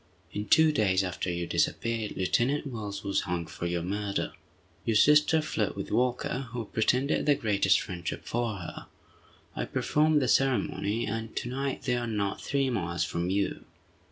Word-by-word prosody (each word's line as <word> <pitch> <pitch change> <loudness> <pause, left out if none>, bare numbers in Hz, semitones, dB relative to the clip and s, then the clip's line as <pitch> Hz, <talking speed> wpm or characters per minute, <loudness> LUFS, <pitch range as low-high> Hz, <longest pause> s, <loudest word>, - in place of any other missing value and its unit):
In 105 +1 -3
two 160 +8 +6
days 100 -8 +2
after 90 0 -3
you 85 0 -2
disappeared, 115 +4 -1
Lieutenant 120 +10 +1
Wells 105 -6 -5
was 100 -1 +1
hung 90 -2 -2
for 85 - -5
your 85 -1 -1
murder. 100 +2 -2 0.5
Your 115 - 0
sister 150 +5 +5
fled 110 -9 -1
with 100 - -5
Walker, 125 +1 0
who 120 -2 -3
pretended 125 +9 +1
the 145 - +6
greatest 105 -7 +3
friendship 90 -4 -5
for 115 -2 -1
her. 90 -4 -8 0.7
I - - -2
performed 155 0 +2
the 130 - 0
ceremony, 120 -4 +1
and 110 +1 -4
to 120 - -2
night 135 +1 -3
they 125 -2 +1
are 120 0 -2
not 105 -3 -2
three 135 -2 0
miles 85 -6 -1
from 85 +1 -2
you." 100 +1 -1
110 Hz, 165 wpm, -29 LUFS, 95-130 Hz, 0.7 s, two